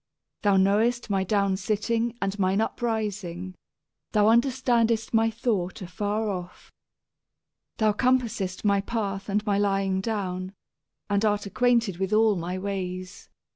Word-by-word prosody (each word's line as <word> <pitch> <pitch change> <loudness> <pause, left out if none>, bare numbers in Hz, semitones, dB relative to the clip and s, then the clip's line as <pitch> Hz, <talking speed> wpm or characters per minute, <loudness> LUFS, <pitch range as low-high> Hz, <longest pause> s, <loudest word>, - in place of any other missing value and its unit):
Thou 200 -2 +3
knowest 215 +5 +2
my 195 -1 +2
downsitting 210 +4 0
and 195 +1 -2
mine 190 +1 +2
uprising; 210 -6 -2 0.6
thou 210 0 +4
understandest 235 -2 +2
my 225 0 +4
thought 220 -6 -2
afar 205 +4 -2
off. 180 -3 -6 1.1
Thou 215 -1 +3
searchest 230 -6 0
out - - -11
my 200 -1 +3
path 200 -2 -3
and 210 +2 0
my 200 -2 +1
lying 195 -1 +1
down, 190 -3 -3 0.5
and 200 0 +1
art 205 -1 +2
ac 200 - -7
quainted 235 -7 +2
with 190 +2 -1
all 215 -1 +4
my 175 +1 -3
ways. 185 -1 -5
205 Hz, 135 wpm, -26 LUFS, 190-225 Hz, 1.1 s, thou